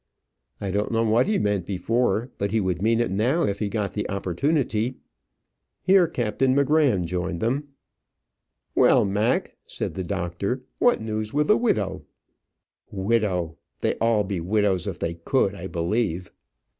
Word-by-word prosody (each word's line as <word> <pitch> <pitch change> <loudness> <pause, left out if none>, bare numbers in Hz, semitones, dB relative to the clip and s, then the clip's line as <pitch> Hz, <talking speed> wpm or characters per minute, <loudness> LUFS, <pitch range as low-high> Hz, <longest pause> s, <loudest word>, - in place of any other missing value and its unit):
"I 100 -2 -3
don't 105 +4 -1
know 115 0 +2
what 115 +5 +3
he 210 -1 +2
meant 100 -4 0
before; 115 +4 0
but 100 - 0
he 110 +2 +1
would 95 -3 -1
mean 115 +2 +2
it 120 -5 0
now, 120 - +1
if 100 -1 -1
he 105 - -1
got 105 -1 -2
the 105 - -3
opportunity." 115 - 0 0.9
Here 185 -2 +5
Captain 130 +1 0
M'Gramm 140 - +3
joined 90 0 -3
them. 135 - -1 1.1
"Well, - - +5
Mac," 105 +5 0
said - - -4
the 95 - -4
doctor, 95 +7 -3 0.2
"what 245 - +3
news 110 +1 -3
with 150 0 +1
the 210 - +7
widow?" 100 - 0 0.9
"Widow! 95 -6 -1 0.2
they'd - - 0
all 115 -2 +3
be 95 -2 -3
widows 95 0 +1
if - - -3
they 85 - -2
could, 95 +5 0
I 95 -2 -6
believe." 90 0 -1
105 Hz, 155 wpm, -24 LUFS, 95-120 Hz, 1.1 s, the